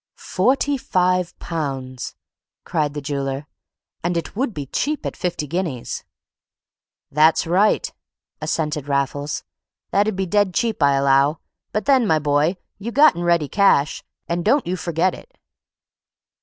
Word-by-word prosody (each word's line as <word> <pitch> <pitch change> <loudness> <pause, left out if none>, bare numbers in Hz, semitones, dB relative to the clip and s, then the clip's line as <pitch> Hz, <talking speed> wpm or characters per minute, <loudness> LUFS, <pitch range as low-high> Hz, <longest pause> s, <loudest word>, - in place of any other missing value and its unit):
"Forty 275 +8 +1
five 180 -3 +1
pounds," 135 -6 -4 0.5
cried 150 -3 -1
the 145 - -4
jeweller; 140 0 -3 0.6
"and 175 0 0
it 170 - -4
would 255 +3 0
be 145 -8 -5
cheap 295 - -2
at - - -3
fifty 175 -4 -2
guineas." 160 -5 -3 1.1
"That's 155 +3 +4
right," 190 +6 +2 0.5
assented 150 -3 -2
Raffles. 145 +1 -1 0.5
"That'd 205 +1 +2
be 190 0 -1
dead 205 0 +1
cheap, 225 -7 0
I 140 -1 +5
allow. 140 +2 +3 0.3
But 215 - -2
then, 265 -5 +4
my 160 - +4
boy, 150 +4 +1 0.2
you 225 +4 -4
gotten 285 - +5
ready 170 -3 +2
cash, 160 -5 +3 0.2
and 170 0 -1
don't 280 - +3
you 180 - -1
forget 175 0 0
it." - - -13
170 Hz, 135 wpm, -21 LUFS, 145-200 Hz, 1.1 s, I